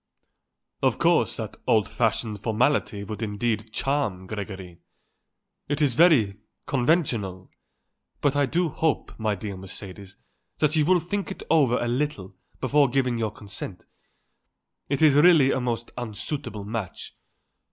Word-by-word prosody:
"Of - - +2
course - - +3
that - - -6
old 110 -2 +3
fashioned 110 -1 -1
formality 110 -2 +1
would 105 +2 -6
in 105 -2 -3
itself 110 0 -1
charm 110 -8 -1
Gregory. 95 -3 -7 0.9
He 145 - -1
is 145 -3 +2
very 120 - +4 0.3
conventional. 120 - 0 0.7
But 145 -1 +1
I 145 -1 +2
do 170 +5 +1
hope, 160 0 -1
my 110 -2 0
dear 100 0 -6
Mercedes, 95 +1 -10 0.4
that 150 0 +2
you 155 -2 +3
will 180 +2 +4
think 200 +4 -3
it 190 - -7
over 140 -7 +4
a 120 - -1
little 120 -7 -2 0.2
before 140 +1 +3
giving 125 -2 0
your 110 -1 0
consent. 100 -2 -8 1.0
It 140 +2 +1
is 150 -3 +7
really 150 -2 +6
a 130 - 0
most 120 -2 -3
unsuitable 110 0 -4
match. 105 -3 -5
120 Hz, 140 wpm, -25 LUFS, 105-145 Hz, 1.0 s, is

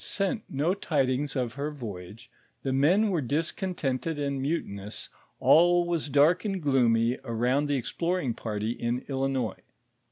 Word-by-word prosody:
101 - - -3
sent 195 +2 0
no 150 +6 +1
tidings 145 -6 0
of 125 -3 -1
her 140 +2 -3
voyage, 115 -4 -8 0.3
the 135 - -1
men 180 +11 +4
were 175 -5 0
discontented 155 +1 -2
and 140 -2 -2
mutinous, 105 -9 -4 0.3
all 175 +2 +5
was 170 -4 -2
dark 150 +6 +4
and 195 -3 -2
gloomy 120 -3 +3
around 125 +4 0
the 145 - +1
exploring 165 +1 -1
party 110 -1 -3
in 120 +1 -2
Illinois. 135 -5 -1
140 Hz, 140 wpm, -28 LUFS, 120-165 Hz, 0.3 s, all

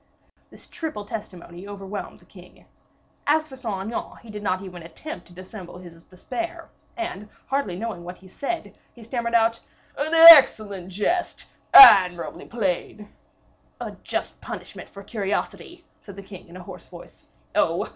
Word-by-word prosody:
This - - -16
triple 260 -11 -6
testimony 185 -3 -9
overwhelmed 200 0 -8
the - - -22
king. - - -18 0.6
As 310 +1 +2
for 270 - -12
Saint 215 -7 -5
Aignan, - - -6
he 230 - -12
did 210 0 -7
not 190 -2 -2
even 180 -2 -10
attempt 175 - -10
to 175 - -18
dissemble 185 0 -11
his 170 -2 -14
despair, 335 - -7 0.3
and, 340 - -6 0.2
hardly 270 -10 -2
knowing 210 -4 -6
what 180 +1 -9
he 190 - -18
said, 320 - -6 0.2
he 235 - -15
stammered 235 0 -3
out, 230 0 +2 0.4
"An 295 +3 -3
excellent 220 - +8
jest! 210 - -2 0.3
admirably 180 - +7
played!" 210 -1 -4 0.7
"A - - -6
just - - -5
punishment - - -9
for 200 - -12
curiosity," 205 -1 -5 0.2
said 200 - -12
the 200 - -10
king, 190 -1 -13
in 170 +2 -12
a 180 - -10
hoarse - - -12
voice. - - -15 0.3
"Oh! - - 0
205 Hz, 155 wpm, -23 LUFS, 185-240 Hz, 0.7 s, excellent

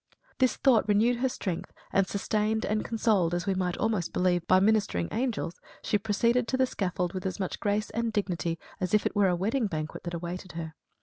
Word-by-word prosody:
This 255 -2 +3
thought 245 -6 +3
renewed 220 +4 +3
her 260 +2 +1
strength 185 -8 -4 0.2
and 195 -1 +3
sustained 215 +2 0
and 215 0 0
consoled, 190 -7 +1
we 195 - +1
might 180 -1 -1
almost 215 -6 0
believe, 175 -2 +1
by 185 - +6
ministering 200 - +2
angels, 230 -8 -2 0.2
she 210 - +1
proceeded 230 +4 +1
to 260 - 0
the 260 - +4
scaffold 180 -6 -2
with 185 0 -3
as 185 - -4
much 190 - -3
grace 210 +1 0
and 230 +1 -1
dignity 175 -5 -1 0.2
as 185 +1 +1
if 210 - +2
it - - -1
were 205 -1 +4
a 180 - +2
wedding 220 +6 0
banquet 155 -3 -4
that 175 0 -3
awaited 175 +1 -6
her. 160 -1 -5
200 Hz, 200 wpm, -28 LUFS, 180-220 Hz, 0.2 s, by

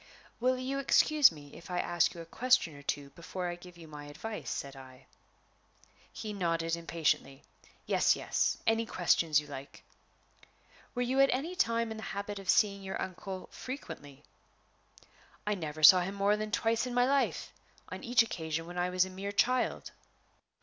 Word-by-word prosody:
"Will 255 +2 +2
you 265 +2 -2
excuse 295 - +5
me 145 -3 -12
if 170 - -12
I 180 - -2
ask 175 -1 +1
you 170 - -7
a - - -9
question 245 - +2
or 145 - -11
two 140 0 -3
before 175 +4 -5
I - - -3
give 175 0 -14
you 165 -1 -12
my 150 -1 -9
advice?" 180 +10 -6
said 140 0 -4
I. 130 0 -13 1.1
He 215 -1 -6
nodded 165 -3 0
impatiently. 160 -4 -1 0.4
"Yes, - - +3
yes - - 0
any 225 0 +2
questions 165 -5 +3
you 150 - -8
like." 140 -1 -10 1.1
"Were 245 - +1
you 260 +2 0
at 275 0 +6
any 300 +8 -2
time 230 -8 +1
in 220 - -5
the - - -7 0.2
habit 200 0 -4
of 195 -2 -9
seeing 200 -2 +3
your 190 0 -5
uncle 185 0 -6
frequently?" 145 - -8 1.2
"I 210 - +1
never 155 -5 -5
saw 180 +4 +10
him 190 +3 -3
more 200 +1 +3
than 215 0 -3
twice 225 +3 +1
in 245 - -4
my 245 0 +4
life 275 +1 0 0.4
on - - -7
each 240 -2 +4
occasion 165 -6 -4
when 175 +1 -6
I 180 +1 +1
was 180 0 +2
a - - -8
mere 195 +2 -5
child." 250 +5 +1
185 Hz, 175 wpm, -31 LUFS, 165-230 Hz, 1.2 s, saw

